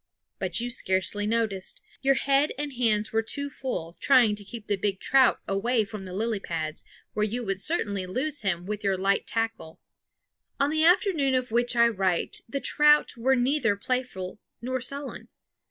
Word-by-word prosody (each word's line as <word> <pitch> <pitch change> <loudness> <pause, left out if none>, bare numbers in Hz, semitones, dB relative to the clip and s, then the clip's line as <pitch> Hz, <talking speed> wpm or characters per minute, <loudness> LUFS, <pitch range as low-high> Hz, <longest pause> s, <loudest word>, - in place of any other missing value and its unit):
But 185 0 +1
you 240 +1 -2
scarcely 205 -2 0
noticed; 215 -4 -1 0.2
your 275 0 +3
head 275 +2 +2
and 290 -1 -4
hands 220 -4 0
were 225 - +3
too 285 +5 -3
full, 180 -12 -5
trying 250 -6 +5
to 205 - -8
keep 225 +1 -9
the 205 - 0
big 195 0 -2
trout 265 -2 +4
away 220 +4 +1
from 205 -1 -8
the 185 - -8
lily 220 0 -1
pads, 160 -4 -4 0.3
where 210 - 0
you 235 +3 -2
would 195 -1 -2
certainly 200 - -1
lose 280 +9 -1
him 180 -3 -1
with 210 +1 -4
your 195 -1 +1
light 195 +1 +1
tackle. 225 -8 -3 0.8
On 280 +1 +2
the 315 0 +2
afternoon 330 -6 +3
of 255 -2 -1
which 240 +1 +1
I 235 0 +6
write 190 -6 -1
the 275 - -2
trout 295 +3 +4
were 260 +3 +2
neither 245 -3 +2
playful 210 -4 -3 0.2
nor 255 +2 -3
sullen. 275 +2 -5
230 Hz, 175 wpm, -27 LUFS, 195-265 Hz, 0.8 s, I